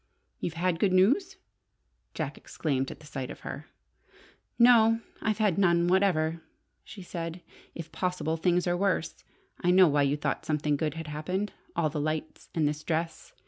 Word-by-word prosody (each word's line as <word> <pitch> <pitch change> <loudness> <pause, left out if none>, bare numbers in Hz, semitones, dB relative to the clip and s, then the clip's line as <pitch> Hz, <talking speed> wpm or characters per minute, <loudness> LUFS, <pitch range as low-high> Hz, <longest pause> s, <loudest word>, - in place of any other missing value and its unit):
"You've 165 - -3
had 170 0 0
good 190 -1 +2
news!" 315 - +3 0.8
Jack - - -3
exclaimed 135 -4 -2
at - - -10
sight 135 -3 -6
of - - -9
her. - - -7 0.9
"No, 225 -2 +6 0.2
I've 215 -1 0
had 210 -5 +2
none 170 -2 +3
whatever," 170 -4 +2 0.4
she 195 - -10
said. 170 0 -6 0.3
"If 165 -1 -7
possible, 180 -3 -1
things 175 +1 +1
are 175 -1 +1
worse. 185 -3 -1 0.4
I 175 - 0
know 185 0 +7
why 145 -1 +2
you 140 +1 +2
thought - - -2
something 150 -1 0
good 150 +1 -2
had 165 0 -5
happened. 180 +7 -3 0.2
All 160 -3 +1
the 150 -1 -2
lights, 155 +1 -4
and 155 -3 +2
this 150 +1 -3
dress! 165 0 -3
170 Hz, 165 wpm, -28 LUFS, 155-190 Hz, 0.9 s, know